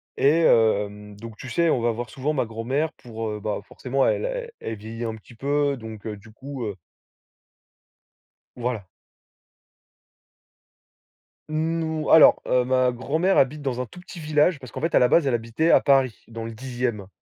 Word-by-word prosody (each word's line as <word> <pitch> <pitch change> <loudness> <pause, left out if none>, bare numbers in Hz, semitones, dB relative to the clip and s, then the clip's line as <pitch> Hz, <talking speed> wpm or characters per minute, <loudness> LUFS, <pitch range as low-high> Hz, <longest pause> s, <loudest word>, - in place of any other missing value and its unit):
et 155 +5 +4
hem, 105 -5 +2
donc 115 -1 -9
tu 130 - -8
sais, 170 +2 +2
on 120 - +1
va 120 - +2
voir 115 0 -5
souvent 140 +3 -2
ma 130 -5 0
grand-mère 130 +8 -2
pour, 115 -2 -6
heu, 105 - -5
bah, 105 0 -3
forcément 135 +1 -1
elle, - - +1
elle - - -4
elle 110 - -5
vieillit 115 +3 -6
un 110 - -3
petit 110 +2 -15
peu, 140 +3 0
donc 110 -3 -9
heu, 105 -2 -4
du 110 +2 -16
coup, 130 +1 -7
heu 105 - -4 1.8
Voilà. 120 -5 -3 2.6
N 160 +1 -1
ou 160 -1 -2
alors, 160 - +8
heu, 125 0 +3
ma 130 0 +2
grand-mère 160 +10 0
habite 140 +3 +2
dans 125 -3 -2
un 125 - -3
tout 180 - -13
petit 180 -1 -11
village, 150 +1 +2
parce 130 -4 -11
qu'en 130 - -6
fait 165 - -1
à - - +7
la 125 - +5
base, 165 +4 +4
elle 130 - +1
habitait 120 +8 +1
à - - +6
Paris, 135 -6 +3
dans 115 0 -7
le 115 - -5
10e 120 -3 -3
125 Hz, 185 wpm, -24 LUFS, 115-150 Hz, 2.6 s, alors